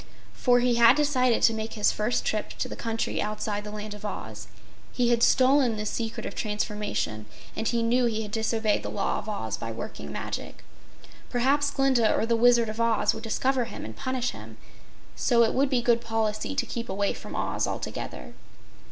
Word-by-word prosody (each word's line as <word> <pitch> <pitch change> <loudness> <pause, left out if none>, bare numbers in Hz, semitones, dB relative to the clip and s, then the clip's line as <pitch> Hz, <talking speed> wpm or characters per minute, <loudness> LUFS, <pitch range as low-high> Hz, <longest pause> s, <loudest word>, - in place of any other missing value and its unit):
For 245 -1 +3
he 245 0 +3
had 235 +2 +8
decided 260 -5 +2
to 230 - +6
make 220 0 -4
his 210 -2 +2
first 215 +3 -1
trip 215 -1 -2
to - - -2
the - - -7
country 225 -1 -2
outside 210 0 -3
the 210 - -7
Land 210 0 -6
of 210 0 -11
Oz. 210 - -6 0.4
He 245 -2 +1
had 235 -1 +2
stolen 260 -2 +4
this 215 0 -2
secret 225 -1 -4
of 200 - -5
transformation 210 - -3 0.3
and 220 - -2
he 235 -1 +1
knew 245 +2 +3
he 220 -1 -1
had 210 - -8
disobeyed 220 -1 0
the - - -5
law 200 - -1
of 215 - -7
Oz 110 - -3
by 115 - -5
working 75 -9 -7
magic. - - -6 0.7
Perhaps 275 +4 +2
Glinda 270 -5 +3
or - - +1
the 230 0 +2
Wizard 235 0 +5
of 215 +2 -3
Oz 230 -1 +2
would - - -7
discover 255 +2 0
him - - -8
and - - -8
punish 260 -2 -2
him, - - -11 0.6
so 235 -2 +3
it 225 - +1
would 270 +1 +2
be 250 -3 +1
good 235 -1 +3
policy 225 +2 -2
to - - 0
keep 235 -2 -5
away 200 +1 0
from - - -9
Oz - - -1
altogether. - - -5
230 Hz, 195 wpm, -27 LUFS, 215-245 Hz, 0.7 s, had